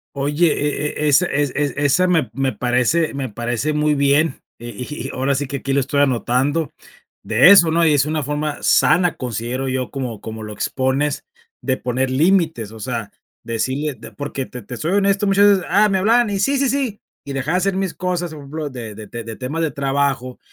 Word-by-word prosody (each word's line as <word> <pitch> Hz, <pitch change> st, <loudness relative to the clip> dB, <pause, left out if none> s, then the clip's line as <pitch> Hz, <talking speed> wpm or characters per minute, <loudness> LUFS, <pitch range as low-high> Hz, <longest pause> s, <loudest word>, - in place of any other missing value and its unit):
Oye, 145 Hz, +4 st, +2 dB
e 150 Hz, +1 st, -2 dB
e -, -, +2 dB
es 145 Hz, +5 st, +5 dB
es 145 Hz, -5 st, 0 dB
es 145 Hz, -3 st, 0 dB
esa 145 Hz, +5 st, +2 dB
me 165 Hz, -9 st, +1 dB
me 135 Hz, +1 st, 0 dB
parece 125 Hz, +8 st, +1 dB
me 135 Hz, -2 st, -3 dB
parece 120 Hz, +7 st, -2 dB
muy 150 Hz, 0 st, +2 dB
bien. 140 Hz, +1 st, +2 dB, 0.2 s
Eh, 120 Hz, 0 st, -7 dB
y 130 Hz, 0 st, -5 dB
y -, -, -7 dB
ahora 135 Hz, +2 st, 0 dB
sí 140 Hz, +1 st, -2 dB
que 140 Hz, -, -4 dB
aquí 135 Hz, 0 st, -3 dB
lo 140 Hz, -, +3 dB
estoy 140 Hz, +1 st, 0 dB
anotando, 135 Hz, +4 st, +1 dB, 0.5 s
de 120 Hz, -, +5 dB
eso, 175 Hz, -5 st, +7 dB
¿no? 165 Hz, 0 st, +3 dB
Y 155 Hz, -, +4 dB
es 145 Hz, 0 st, +3 dB
una 155 Hz, 0 st, -1 dB
forma 150 Hz, +1 st, -3 dB
sana, 180 Hz, 0 st, +3 dB
considero 125 Hz, +2 st, -3 dB
yo, 130 Hz, -1 st, -2 dB
como 125 Hz, -6 st, -5 dB
como 110 Hz, 0 st, -7 dB
lo 105 Hz, -1 st, -7 dB
expones, 130 Hz, +6 st, -1 dB, 0.4 s
de 130 Hz, -, 0 dB
poner 130 Hz, +1 st, -1 dB
límites, 155 Hz, -, +1 dB
o 110 Hz, -, -11 dB
sea, 115 Hz, -3 st, -4 dB, 0.3 s
decirle 130 Hz, +6 st, -2 dB
de 115 Hz, -, -12 dB
porque 145 Hz, -2 st, -5 dB
te 125 Hz, -, -9 dB
te -, -, -23 dB
te 125 Hz, -, -5 dB
soy 165 Hz, +8 st, -2 dB
honesto, 200 Hz, 0 st, +2 dB
muchas 200 Hz, +1 st, +5 dB
veces, 180 Hz, -, -6 dB
ah, 205 Hz, +3 st, +4 dB
me 190 Hz, -, +2 dB
hablaban 225 Hz, +3 st, +3 dB
y 200 Hz, -, -1 dB
sí, 275 Hz, +7 st, +1 dB
sí, 270 Hz, -2 st, +1 dB
sí. 260 Hz, -7 st, -2 dB, 0.3 s
Y 140 Hz, -, -5 dB
dejaba 150 Hz, +7 st, 0 dB
hacer 190 Hz, +1 st, 0 dB
mis 190 Hz, -2 st, -1 dB
cosas, 180 Hz, -2 st, -2 dB
por 150 Hz, -, -9 dB
ejemplo, 145 Hz, +1 st, -5 dB
de 115 Hz, -4 st, -7 dB
de 105 Hz, 0 st, -9 dB, 0.2 s
de 115 Hz, -1 st, -7 dB
temas 135 Hz, +6 st, -4 dB
de 160 Hz, -2 st, 0 dB
trabajo, 135 Hz, -2 st, -1 dB
140 Hz, 215 wpm, -20 LUFS, 130-165 Hz, 0.5 s, eso